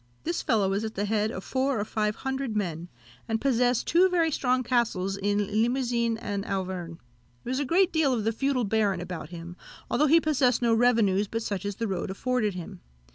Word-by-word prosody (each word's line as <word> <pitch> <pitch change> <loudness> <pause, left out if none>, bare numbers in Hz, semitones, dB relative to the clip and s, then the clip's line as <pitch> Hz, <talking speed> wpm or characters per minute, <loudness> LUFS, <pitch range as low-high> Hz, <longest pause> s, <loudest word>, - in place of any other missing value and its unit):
This 340 +1 -2
fellow 215 -5 +2
was 200 +2 -1
at 220 0 -5
the 205 - -1
head 215 0 +1
of 190 -4 -6
four 265 -2 0
or 205 - -1
five 210 -1 -1
hundred 265 -2 -3
men, 175 -4 -3 0.4
and 225 0 0
possessed 245 -2 +2
two 360 +3 +4
very 335 -3 +2
strong 255 -2 +1
castles 220 -6 0
in 205 +1 0
Limousin 235 -2 0
and 205 -3 -4
Auvergne. 185 -4 -4 0.5
There 245 - -4
was 260 - 0
a 285 - 0
good 365 +6 +3
deal 315 -4 +2
of 235 -4 0
the 225 - +1
feudal 265 +2 0
baron 205 -3 +1
about 175 -3 -6
him, 170 0 -8 0.4
although 300 - +3
he 325 +4 +6
possessed 275 -6 +2
no 230 -1 +3
revenues 225 -4 +3
but 225 +2 -3
such 200 -3 -3
as 205 - -3
the 230 +1 -2
road 185 -3 -3
afforded 215 0 -1
him. 175 -2 -8
225 Hz, 205 wpm, -27 LUFS, 200-255 Hz, 0.5 s, he